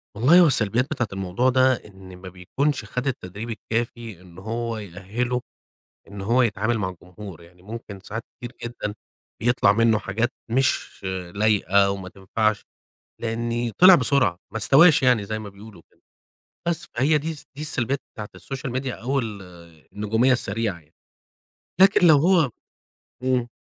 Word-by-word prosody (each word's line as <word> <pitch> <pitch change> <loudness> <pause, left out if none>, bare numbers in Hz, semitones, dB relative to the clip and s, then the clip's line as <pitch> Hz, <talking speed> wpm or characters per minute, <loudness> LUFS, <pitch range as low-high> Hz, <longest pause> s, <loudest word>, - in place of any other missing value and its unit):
والله 135 - +5
هو 175 - +7
السلبيات 120 -2 +3
بتاعة 125 -6 -1
الموضوع 95 +6 0
ده 130 +1 +4
إن 95 -2 -13
ما 95 0 -10
بيكُونش 110 +9 -2
خد 125 +5 -4
التدريب 110 -3 -5
الكافي 115 -2 -4
إن 90 -2 -17
هو 115 +3 -4
يأهله 105 +6 -4 0.7
إن 100 0 -9
هو 115 +6 +2
يتعامل 110 0 0
مع 95 -3 -1
الجمهور، 90 0 -11
يعني 90 +1 -19
ممكن 105 -1 -9
ساعات 115 +4 -7
كتير 120 0 -8
جدًا 115 -3 -5 0.5
بيطلَع 120 -3 +3
منه 115 0 +3
حاجات 115 +5 -2 0.2
مش 130 +3 0 0.3
لايقة 100 -2 +3
وما 95 -1 -5
تنفعش، 105 +3 -1 0.6
لإن 115 +1 -2
طِلع 185 +1 +9
بسرعة 130 - +2
ما - - -4
استواش 140 - +6
يعني 125 -5 +3
زَي 110 +2 -4
ما 105 -1 -8
بيقولوا 100 -1 -14
كده، - - -33 0.7
بس 170 -1 -1
فهي 140 +6 +2
دي 155 +3 -4
الس 155 - -9
دي 145 - -7
السلبيات 140 -3 0
بتاعة 105 -2 -7
الsocial 135 -2 -6
media 130 +1 -2
أو 135 +4 0
ال 110 -5 -5 0.5
النجومية 110 +5 +1
السريعة 110 -5 -2
يعني. 80 0 -28 0.9
لكن 190 -2 +6
لو 160 -3 +7
هو 165 -3 +3 0.7
إمم. 130 -2 +1
115 Hz, 150 wpm, -23 LUFS, 100-130 Hz, 0.9 s, طِلع